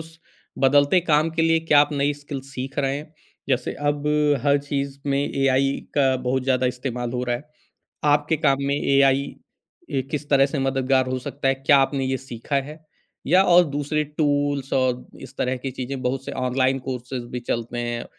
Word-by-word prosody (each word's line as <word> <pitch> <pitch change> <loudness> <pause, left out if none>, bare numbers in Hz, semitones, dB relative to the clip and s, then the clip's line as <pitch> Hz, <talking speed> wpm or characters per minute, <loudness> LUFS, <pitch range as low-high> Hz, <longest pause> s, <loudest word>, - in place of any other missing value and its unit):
उस 165 +1 -13 0.5
बदलते 145 +6 +4
काम 155 -1 +2
के 165 0 0
लिए 165 0 +3
क्या 145 -1 +8
आप 145 +1 +2
नई 145 0 +1
स्किल 145 -1 -7
सीख 135 +1 -6
रहे 135 -1 0
हैं? 150 +1 -9 0.4
जैसे 125 -2 0 0.2
अब 145 0 -4 0.4
हर 140 0 +4
चीज़ 140 -1 -4
में 140 0 +1
एआई 135 -1 +1 0.2
का 135 -2 +3
बहुत 130 +1 -1
ज़्यादा 130 -1 +2
इस्तेमाल 125 -1 -3
हो 125 0 -2
रहा 120 -1 0
है। 125 - -11 0.7
आपके 150 +2 +1
काम 135 -1 +4
में 140 - +1
एआई 140 -1 +3
अ, 135 - -8
किस 150 -1 -4
तरह 135 -1 +5
से 140 0 -3
मददगार 135 -1 +1
हो 130 0 -2
सकता 140 +1 -4
है? 135 - +4
क्या 140 +2 +4
आपने 135 0 +1
ये 130 0 -1
सीखा 120 +4 -4
है? 155 +1 -12 0.4
या 180 +5 +5
और 180 -1 +6
दूसरे 145 +2 -1
टूल्स 145 -2 0
और 125 -1 0 0.2
इस - - -11
तरह 130 0 -1
की 135 - -3
चीज़ें 130 +1 -5
बहुत 130 +1 -2
से - - -5
ऑनलाइन 130 +1 +1
कोर्सेज़ 125 -1 -5
भी 125 - -3
चलते 120 0 -3
हैं। 120 0 -3
135 Hz, 190 wpm, -23 LUFS, 130-145 Hz, 0.7 s, क्या